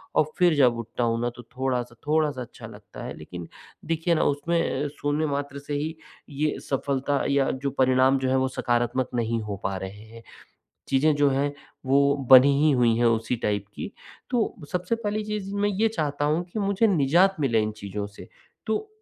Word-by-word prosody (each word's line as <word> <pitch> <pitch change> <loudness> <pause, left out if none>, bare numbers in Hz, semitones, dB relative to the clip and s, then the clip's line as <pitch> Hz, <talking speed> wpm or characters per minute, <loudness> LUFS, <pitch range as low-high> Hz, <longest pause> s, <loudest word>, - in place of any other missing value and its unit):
और - - +4
फिर 175 -2 +4
जब 125 -4 +4
उठता 115 +1 -4
हूँ 115 0 +1
ना, 120 - 0
तो 120 0 -12
थोड़ा-सा 125 -1 -3
थोड़ा-सा 150 -3 +1
अच्छा 120 - -9
लगता - - -11
है, - - -5
लेकिन 85 +2 -8 0.4
देखिए 165 +1 0
ना - - +2
उसमें 145 -1 0
शून्य 145 +2 0
मात्रा 140 -1 -3
से 145 - -3
ही, 155 +3 -2 0.3
ये 150 +1 -1
सफलता 140 +1 0
या 140 -1 +2
जो 140 - +1
परिणाम 130 +1 +4
जो 130 0 -1
है, 130 - +2
वो 130 0 +2
सकारात्मक 120 0 0
नहीं 115 -1 0
हो 105 -2 -5
पा 95 - -1
रहे 95 +3 -8
हैं। 115 0 -12 0.6
चीज़ें 140 +3 +3
जो 145 -1 +3
हैं, 140 +1 0 0.3
वो 140 +1 +4
बनी 135 +2 +9
ही 155 0 +5
हुईं 120 -4 +3
हैं 120 - +2
उसी 115 +1 +1
टाइप 100 -1 0
की, - - -5 0.4
तो 240 -3 0 0.2
सबसे 180 +5 -1
पहली 215 -1 -2
चीज़ 210 -2 -4
मैं 205 0 +1
ये 205 +3 +2
चाहता 150 -8 -2
हूँ 155 +4 +1
कि 220 - -2
मुझे 200 +2 +2
निज़ात 180 +2 +3
मिले 125 -6 +2
इन 105 - -2
चीज़ों 100 0 -5
से, 105 - -13 0.4
तो 220 - -1
140 Hz, 190 wpm, -25 LUFS, 120-160 Hz, 0.6 s, बनी